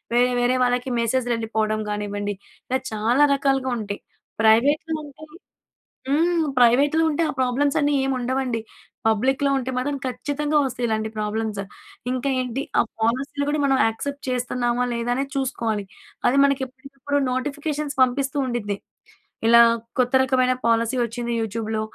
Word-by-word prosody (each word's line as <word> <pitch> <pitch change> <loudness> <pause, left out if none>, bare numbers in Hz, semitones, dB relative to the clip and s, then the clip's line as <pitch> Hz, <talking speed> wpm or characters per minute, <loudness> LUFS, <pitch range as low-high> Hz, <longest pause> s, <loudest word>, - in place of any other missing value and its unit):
వేరే, 245 +1 +4
వేరే 245 +1 +2
వాళ్ళకి 245 +1 0
మెసేజ్‌లు 240 +1 0
ఎళ్ళిపోవడం 220 -1 -1
కానివ్వండి, 205 0 -3 0.4
ఇలా 260 - +1
చాలా 230 +7 +3
రకాలుగా 270 -2 +1
ఉంటాయి. 205 -2 -5 0.4
ప్రైవేట్‍లో 285 +9 +3
ఉంటే 295 +1 -12 0.9
హ్మ్. 330 +3 +2 0.2
ప్రైవేట్‌లో 280 +7 +4
ఉంటే, 330 +3 0
ఆ - - -8
ప్రాబ్లమ్స్ 265 +3 +1
అన్నీ 290 0 +2
ఏమి 270 - 0
ఉండవండి. 250 -2 -1 0.5
పబ్లిక్‌లో 265 +6 +1
ఉంటే 260 +1 -4
మాత్రం 280 +2 -1
ఖచ్చితంగా 295 +3 -1
వస్తాయి 245 -2 -2
ఇలాంటి 220 0 -1
ప్రాబ్లమ్సు. 210 -1 -2 0.5
ఇంకా 255 +2 -1
ఏంటి 255 +2 -3 0.2
ఆ - - +7 0.2
పాలసీలు 270 +5 0
కూడా 300 -1 0
మనం 270 -1 +3
యాక్సెప్ట్ 280 +6 -4
చేస్తున్నామా, 245 0 0
లేదానేది 245 +4 -1
చూసుకోవాలి. 230 -6 -1 0.4
అది 265 +3 +3
మనకి 275 -1 +1
ఎప్పటికప్పుడు 275 +2 -4
నోటిఫికేషన్స్ 290 +2 -3
పంపిస్తూండిద్ది. 255 -5 -1 0.7
ఇలా, 235 0 +7 0.4
కొత్త 250 +1 +2
రకమైన 255 -1 +2
పాలసీ 230 +2 +2
వచ్చింది 235 +1 -3
యూట్యూబ్‌లో, 220 0 -2
255 Hz, 130 wpm, -23 LUFS, 230-275 Hz, 0.9 s, ఆ